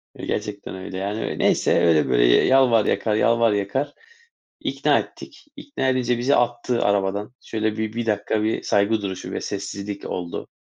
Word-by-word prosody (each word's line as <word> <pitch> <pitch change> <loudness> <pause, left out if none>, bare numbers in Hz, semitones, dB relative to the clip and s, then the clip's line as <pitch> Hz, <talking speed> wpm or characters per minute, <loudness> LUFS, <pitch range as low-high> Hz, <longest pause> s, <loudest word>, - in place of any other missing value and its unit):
Ya - - -7
gerçekten 100 -2 -4
öyle, 95 0 -7
yani, 100 +3 -3
neyse - - +2
öyle 80 -5 +3
böyle, - - +3
yalvar 115 - +4
yakar, 105 +1 0
yalvar 115 0 +3
yakar, 100 +8 -2 0.7
ikna - - +1
ettik. - - -10
İkna 285 - -3
edince 125 -2 +1
bizi 125 +4 +2
attı 120 0 0
arabadan. 100 +3 0
Şöyle 110 -1 -2
bir 110 0 -3
1 120 0 -3
dakika, 105 0 0
bir 110 - 0
saygı 105 +2 +1
duruşu 95 -2 -5
ve - - -4
sessizlik 100 0 -5
oldu 90 -1 -5
105 Hz, 160 wpm, -23 LUFS, 100-120 Hz, 0.7 s, yalvar